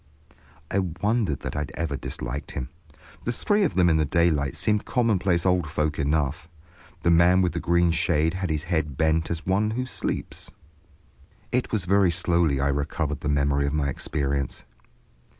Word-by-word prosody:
I 100 Hz, -, +2 dB
wondered 95 Hz, -, -1 dB
that -, -, -5 dB
I -, -, -1 dB
had 75 Hz, -, -4 dB
ever 80 Hz, -3 st, -2 dB
disliked 65 Hz, +1 st, -5 dB
him. 65 Hz, -, -4 dB, 0.5 s
The 120 Hz, -, -1 dB
three 205 Hz, -, +1 dB
of 175 Hz, -, 0 dB
them 90 Hz, -2 st, +4 dB
in 80 Hz, -2 st, +4 dB
the 80 Hz, -, +2 dB
daylight 75 Hz, -4 st, +1 dB
seemed 105 Hz, -1 st, +1 dB
commonplace 100 Hz, -8 st, +1 dB
old 90 Hz, -4 st, +2 dB
folk 75 Hz, 0 st, -1 dB
enough. 75 Hz, +1 st, 0 dB, 0.6 s
The 85 Hz, -, +4 dB
man 90 Hz, +2 st, +5 dB
with 90 Hz, -, +1 dB
the 85 Hz, -, -2 dB
green 85 Hz, 0 st, +2 dB
shade 80 Hz, 0 st, +1 dB
had 95 Hz, -1 st, -3 dB
his 75 Hz, -1 st, -1 dB
head 80 Hz, -5 st, -2 dB
bent 80 Hz, 0 st, +1 dB
as 85 Hz, 0 st, -4 dB
one 100 Hz, +3 st, +1 dB
who 125 Hz, +4 st, -2 dB
sleeps. 130 Hz, -, -4 dB, 1.0 s
It 125 Hz, 0 st, 0 dB
was 105 Hz, -5 st, 0 dB
very 100 Hz, 0 st, +4 dB
slowly 85 Hz, -4 st, +1 dB
I 70 Hz, +1 st, +1 dB
recovered 75 Hz, +1 st, -2 dB
the 75 Hz, -, -3 dB
memory 70 Hz, 0 st, +1 dB
of 70 Hz, -, -2 dB
my 75 Hz, -2 st, 0 dB
experience. 70 Hz, -1 st, -2 dB
85 Hz, 175 wpm, -25 LUFS, 75-95 Hz, 1.0 s, man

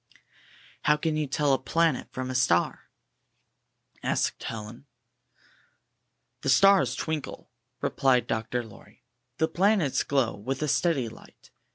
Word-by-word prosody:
''How 150 Hz, 0 st, +4 dB
can 160 Hz, 0 st, -1 dB
you 155 Hz, -1 st, -1 dB
tell 140 Hz, +1 st, +1 dB
a 135 Hz, -, +2 dB
planet 165 Hz, 0 st, +1 dB
from 130 Hz, 0 st, -4 dB
a -, -, -4 dB
star?" 125 Hz, -9 st, +1 dB, 1.1 s
asked -, -, -1 dB
Helen. 115 Hz, +5 st, -7 dB, 1.5 s
"The 135 Hz, -, -2 dB
stars 155 Hz, -2 st, +5 dB
twinkle," 155 Hz, -2 st, -5 dB, 0.3 s
replied 125 Hz, -3 st, +2 dB
Dr. 115 Hz, +2 st, -2 dB
Lorr5\ 110 Hz, -3 st, -16 dB, 0.4 s
"The 160 Hz, -, +2 dB
planets 180 Hz, -3 st, +2 dB
glow 135 Hz, -5 st, 0 dB
with 130 Hz, +8 st, -4 dB
a -, -, 0 dB
steady 145 Hz, -4 st, +1 dB
light. 110 Hz, -, -15 dB
135 Hz, 125 wpm, -27 LUFS, 125-155 Hz, 1.5 s, stars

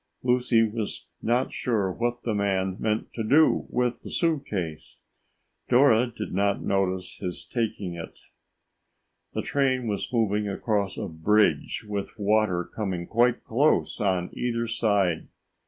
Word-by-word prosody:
Lucy 125 Hz, -2 st, +3 dB
was 110 Hz, -1 st, -4 dB, 0.2 s
not 120 Hz, +3 st, +1 dB
sure 105 Hz, -6 st, 0 dB
what 120 Hz, +4 st, -2 dB
the 115 Hz, -, -1 dB
man 95 Hz, -2 st, 0 dB
meant 110 Hz, 0 st, -1 dB
to 115 Hz, -, -3 dB
do 145 Hz, +8 st, +4 dB
with 125 Hz, -1 st, 0 dB
the -, -, -9 dB
suit 160 Hz, -5 st, 0 dB
case. 85 Hz, -6 st, -5 dB, 0.7 s
Dora 125 Hz, -2 st, +5 dB
did 115 Hz, -3 st, -6 dB
not 100 Hz, +1 st, +1 dB
notice 95 Hz, -2 st, -1 dB
his 90 Hz, -2 st, -5 dB
taking 105 Hz, -7 st, -2 dB
it. 85 Hz, -1 st, -8 dB, 1.2 s
The -, -, -1 dB
train 130 Hz, -3 st, +1 dB
was 105 Hz, +1 st, -3 dB
moving 105 Hz, -3 st, +1 dB
across 100 Hz, -1 st, -1 dB
a -, -, -3 dB
bridge 105 Hz, +7 st, +1 dB
with 100 Hz, -1 st, -4 dB
water 105 Hz, -3 st, +2 dB
coming 95 Hz, -3 st, -4 dB
quite 120 Hz, +3 st, +2 dB
close 140 Hz, +7 st, +2 dB
on 95 Hz, -3 st, 0 dB
either 115 Hz, -1 st, -1 dB
side. 100 Hz, -7 st, +1 dB
110 Hz, 140 wpm, -26 LUFS, 95-120 Hz, 1.2 s, Dora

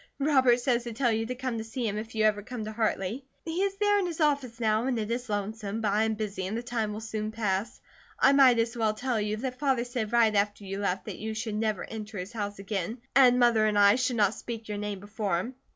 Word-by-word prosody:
Robert 265 Hz, -4 st, +4 dB
says 245 Hz, -1 st, +1 dB
to 235 Hz, -, -5 dB
tell 240 Hz, +1 st, +1 dB
you 225 Hz, 0 st, -1 dB
to 250 Hz, -, -3 dB
come 250 Hz, -2 st, -3 dB
to -, -, -4 dB
see 225 Hz, +2 st, -3 dB
him 205 Hz, -, -2 dB
if 225 Hz, +1 st, -6 dB
you 220 Hz, -, +2 dB
ever 210 Hz, -1 st, +3 dB
come 225 Hz, +1 st, -6 dB
to 215 Hz, -, -5 dB
Hartley. 220 Hz, +2 st, -1 dB, 0.2 s
He 335 Hz, +3 st, -2 dB
is 395 Hz, 0 st, 0 dB
there 410 Hz, 0 st, +3 dB
in 375 Hz, -, 0 dB
his 335 Hz, -2 st, -5 dB
office 280 Hz, -6 st, +1 dB
now 220 Hz, 0 st, +1 dB
and 255 Hz, -3 st, 0 dB
it 220 Hz, 0 st, -2 dB
is 245 Hz, 0 st, -3 dB
lonesome, 205 Hz, +1 st, -3 dB
but 215 Hz, -3 st, 0 dB
I 215 Hz, +2 st, +2 dB
am 220 Hz, 0 st, 0 dB
busy 205 Hz, -3 st, -3 dB
and 215 Hz, +4 st, -3 dB
the 235 Hz, -, -4 dB
time 230 Hz, -3 st, -2 dB
will 210 Hz, +1 st, -5 dB
soon 215 Hz, -1 st, -4 dB
pass. 215 Hz, 0 st, -2 dB, 0.4 s
I 275 Hz, -, +6 dB
might 265 Hz, -3 st, +6 dB
as 230 Hz, +1 st, 0 dB
well 220 Hz, -2 st, +1 dB
tell 245 Hz, -1 st, -1 dB
you 210 Hz, +1 st, -1 dB
that 255 Hz, +2 st, -4 dB
Father 265 Hz, -4 st, +1 dB
said 240 Hz, -3 st, -3 dB
right 230 Hz, -2 st, +4 dB
after 205 Hz, 0 st, 0 dB
you 195 Hz, 0 st, -5 dB
left 195 Hz, -2 st, -1 dB
that -, -, -6 dB
you 220 Hz, 0 st, -4 dB
should 225 Hz, -1 st, -3 dB
never 215 Hz, -2 st, -1 dB
enter 215 Hz, -1 st, -7 dB
his 185 Hz, +5 st, -6 dB
house 205 Hz, -2 st, -4 dB
again, 195 Hz, +2 st, -3 dB, 0.2 s
and 255 Hz, -2 st, +7 dB
Mother 235 Hz, -3 st, +4 dB
and 210 Hz, -1 st, +1 dB
I 200 Hz, 0 st, +7 dB
should 250 Hz, +1 st, 0 dB
not 205 Hz, -2 st, +3 dB
speak 230 Hz, -1 st, -7 dB
your 210 Hz, -1 st, -4 dB
name 205 Hz, -1 st, -4 dB
before 205 Hz, -2 st, -2 dB
him. 235 Hz, +8 st, -5 dB
220 Hz, 265 wpm, -28 LUFS, 210-245 Hz, 0.4 s, and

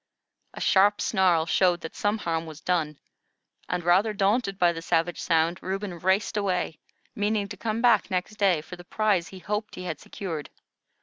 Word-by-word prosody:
A -, -, -7 dB
sharp 205 Hz, +2 st, +4 dB
snarl 185 Hz, -7 st, +2 dB
showed 175 Hz, 0 st, +2 dB
that 160 Hz, -, -8 dB
some 205 Hz, +1 st, 0 dB
harm 165 Hz, -5 st, -2 dB
was 155 Hz, -1 st, -9 dB
done, 160 Hz, -5 st, -1 dB, 0.7 s
and, 180 Hz, -1 st, -1 dB
rather 190 Hz, +6 st, +3 dB
daunted 200 Hz, 0 st, +1 dB
by 175 Hz, -2 st, +4 dB
the 165 Hz, -, -6 dB
savage 170 Hz, +1 st, 0 dB
sound, 165 Hz, 0 st, +1 dB
Reuben 190 Hz, -2 st, -4 dB
raced 190 Hz, +4 st, +1 dB
away, 185 Hz, -5 st, -1 dB, 0.3 s
meaning 205 Hz, 0 st, 0 dB
to -, -, -6 dB
come 225 Hz, +1 st, -3 dB
back 245 Hz, -, +4 dB
next 185 Hz, +3 st, -2 dB
day 190 Hz, -6 st, +3 dB
for 170 Hz, -, -10 dB
the 175 Hz, -, -11 dB
prize 195 Hz, -2 st, +1 dB
he 195 Hz, -, -11 dB
hoped 210 Hz, +4 st, -4 dB
he 180 Hz, -, -7 dB
had 160 Hz, -5 st, -4 dB
secured. 165 Hz, -7 st, -6 dB
185 Hz, 180 wpm, -26 LUFS, 170-205 Hz, 0.7 s, sharp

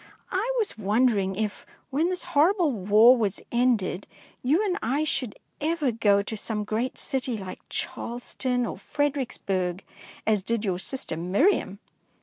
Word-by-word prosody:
I 405 Hz, +6 st, 0 dB
was 430 Hz, -, -1 dB
wondering 205 Hz, -2 st, +2 dB
if, 210 Hz, 0 st, -3 dB, 0.3 s
when 310 Hz, +6 st, +2 dB
this 365 Hz, -1 st, -2 dB
horrible 345 Hz, +1 st, +3 dB
war 215 Hz, +3 st, +6 dB
was 210 Hz, -5 st, -1 dB
ended, 235 Hz, -6 st, +1 dB, 0.3 s
you 310 Hz, +12 st, +2 dB
and 370 Hz, -3 st, 0 dB
I 275 Hz, +7 st, 0 dB
should 255 Hz, -7 st, -1 dB, 0.2 s
ever 310 Hz, -3 st, +1 dB
go 205 Hz, -3 st, +3 dB
to 220 Hz, -, -5 dB
some 210 Hz, 0 st, -2 dB
great 220 Hz, +5 st, -2 dB
city 255 Hz, -3 st, -2 dB
like 190 Hz, -2 st, -7 dB
Charleston 245 Hz, +1 st, -3 dB
or -, -, -5 dB
Fredericksburg, 200 Hz, -11 st, -1 dB, 0.4 s
as 215 Hz, -2 st, +2 dB
did 230 Hz, +2 st, -1 dB
your 180 Hz, -3 st, 0 dB
sister 260 Hz, -5 st, -3 dB
Miriam. 195 Hz, -, +1 dB
235 Hz, 140 wpm, -26 LUFS, 205-285 Hz, 0.4 s, war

